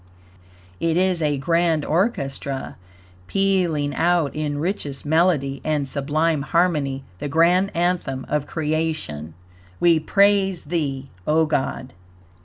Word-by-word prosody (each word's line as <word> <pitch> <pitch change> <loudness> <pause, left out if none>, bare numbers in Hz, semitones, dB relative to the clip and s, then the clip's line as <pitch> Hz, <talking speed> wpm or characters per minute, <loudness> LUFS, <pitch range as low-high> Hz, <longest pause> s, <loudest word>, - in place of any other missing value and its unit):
It 165 0 +1
is 185 -2 +1
a 150 -2 +1
grand 165 +1 +1
orchestra, 140 - -2 0.5
pealing 180 -7 +1
out 170 -3 +1
in 150 -1 -2
richest 150 -5 -3
melody 150 -4 +2
and 150 -3 0
sublime 150 +3 0
HARMONY, 150 -4 0 0.2
the 145 - -4
grand 175 +5 +3
Anthem 170 -7 -1
of 150 -1 -1
Creation: 155 - -3 0.4
"We 170 -2 +4
Praise 195 +2 +2
Thee, 140 -4 -3 0.2
O 160 +1 +3
God." 135 -3 -2
155 Hz, 110 wpm, -22 LUFS, 140-175 Hz, 0.5 s, We